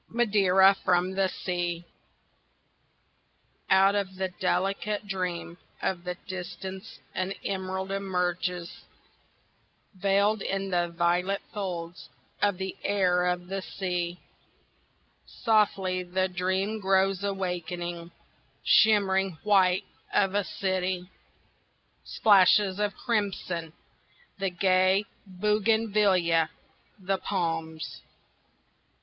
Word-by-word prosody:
Madeira 195 -4 +4
from 180 0 +2
the 190 0 +1
Sea 175 -2 -3 1.8
Out 195 +1 +5
of 195 -2 -2
the 190 0 -2
delicate 195 +3 -1
dream 180 -3 -4 0.2
of 180 -2 -2
the 180 0 -3
distance 190 +2 -7 0.2
an 185 +1 -2
emerald 190 0 -3
emerges 180 -2 -2 1.1
Veiled 200 +2 +2
in 195 0 -2
the 175 -1 +1
violet 180 +3 +1
folds 175 -4 -5 0.3
of 205 -3 +2
the 190 0 -4
air 180 -3 +2
of 180 0 -1
the 195 +2 -4
sea; 180 -2 -3 1.2
Softly 195 -5 +2
the 185 +1 -1
dream 190 +4 -1
grows 195 0 +2
awakening 175 -3 -3 0.5
shimmering 195 -4 +4
white 190 -2 +4 0.3
of 195 -1 +2
a 205 0 +1
city, 185 -1 -2 0.9
Splashes 200 -1 +4
of 205 -1 0
crimson, 190 -7 -2 0.7
the 195 0 0
gay 185 +2 +3 0.2
bougainvillea, 200 -4 +2 0.5
the 195 -1 -2
palms. 160 -8 -3
190 Hz, 90 wpm, -27 LUFS, 180-195 Hz, 1.8 s, Out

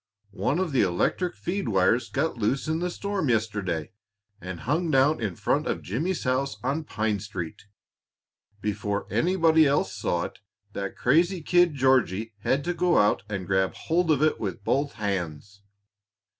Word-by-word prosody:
One 125 - +1
of 185 -3 -1
the 135 - +3
electric 170 - 0
feed 180 -7 -3
wires 110 +5 +2
got 145 +2 -1
loose 120 +6 -1
in 160 +1 0
the 180 +1 -1
storm 195 -4 -2
yesterday, 105 -8 -1 0.5
and 90 -1 -6
hung 160 +7 0
down 140 0 +3
in 100 -6 -2
front - - 0
of - - -2
Jimmy's 160 - -2
house 130 +2 0
on 145 +5 -1
Pine 110 -5 -1
Street. 95 -1 -7 0.9
Before 105 -1 -2
anybody 165 -3 +4
else 140 -9 +1
saw 85 -1 -1
it, - - -7 0.3
that 100 -1 -5
crazy 170 +6 +2
kid 175 -2 +3
Georgie 120 -5 +2
had 135 +7 0
to 175 - -1
go 175 0 +2
out 105 - +3
and 95 -3 -3
grab 95 0 +1
hold 170 +1 0
of 150 -2 +3
it 155 - +2
with 100 -2 -4
both 140 +5 0
hands." 100 -2 -4
130 Hz, 160 wpm, -26 LUFS, 100-160 Hz, 0.9 s, anybody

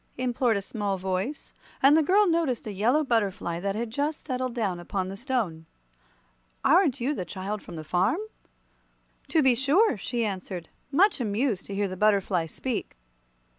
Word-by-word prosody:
implored 245 -2 +1
a 200 - -4
small 200 -2 -2
voice, 190 +9 -3 0.3
and 275 +2 +6
the 320 - +5
girl 390 +7 +4
noticed 330 - 0
a 210 - -4
yellow 240 +10 +2
butterfly 200 - 0
that 195 +2 -2
had 225 0 -3
just 290 +5 -2
settled 255 -3 -2
down 200 -7 -1
upon 185 +2 -3
the 195 - -6
stone. 205 - -2 1.0
"Aren't 300 -3 +4
you 260 +5 0
the 185 - -3
child 195 +3 -5
from 175 - -10
the 155 - -6
farm?" 185 - +1 1.1
"To 320 -3 +3
be 260 -1 +5
sure," 285 - +3
she 235 +3 -2
answered, 185 -4 -5 0.2
much 365 +1 +4
amused 215 -1 -1
to 200 - -5
hear 200 0 0
the 185 - -5
butterfly 195 -4 +2
speak. 235 - -4
225 Hz, 170 wpm, -27 LUFS, 190-270 Hz, 1.1 s, and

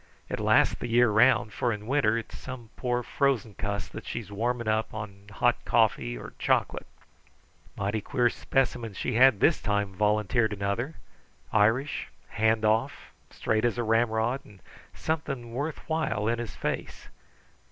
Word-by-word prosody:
It - - -3
lasts - - +4
the - - -5
year 120 -1 +4
round, 110 -1 +4
for 120 - 0
in 105 -1 -5
winter 115 -4 +2
it's 115 - -6
some 125 -3 -9
poor, 125 -1 -1
frozen 130 -7 0
cuss 100 +1 -3
that - - -8
she's 110 -4 -5
warming 120 +3 -1
up 110 0 0
on 100 -1 -8
hot 105 - +1
coffee - - +2
or - - -9
chocolate." - - 0 0.9
"Mighty 100 +2 -1
queer 125 +2 +1
specimen 120 -5 -1
she 125 - -2
had 125 -2 +6
this 165 - +4
time," 105 -2 -1
volunteered 105 +2 +1
another. 100 +9 -2 0.6
"Irish, 110 +7 +2 0.2
hand 110 0 +1
off, 110 +1 0 0.2
straight 110 0 -1
as 120 -1 +1
a 120 - 0
ramrod, 115 +3 +1
and 100 -2 -18 0.3
something 140 -7 -3
worth 145 +5 -4
while 160 -10 -1
in 120 0 +1
his 110 -8 -5
face. - - -4
115 Hz, 150 wpm, -28 LUFS, 105-125 Hz, 0.9 s, had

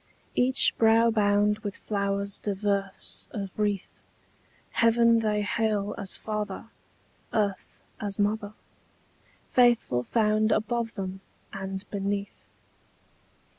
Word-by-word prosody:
Each 255 +2 +3
brow 225 +1 +5
bound 210 -1 +2
with 205 -2 -5
flowers 200 -1 -1
diverse 200 -1 -2
of 195 -3 -5
wreath, 205 -2 -2 0.7
Heaven 230 0 +4
they 210 -2 0
hail 210 -1 0
as 195 -2 -1
father, 210 -1 -4 0.6
earth 200 -3 -2 0.2
as 200 -2 -3
mother, 205 0 0 1.0
Faithful 240 - +3
found 215 - +2
above 225 +1 0
them 190 -1 -5 0.3
and 190 0 -5
beneath. 200 0 -3
210 Hz, 95 wpm, -27 LUFS, 200-220 Hz, 1.0 s, brow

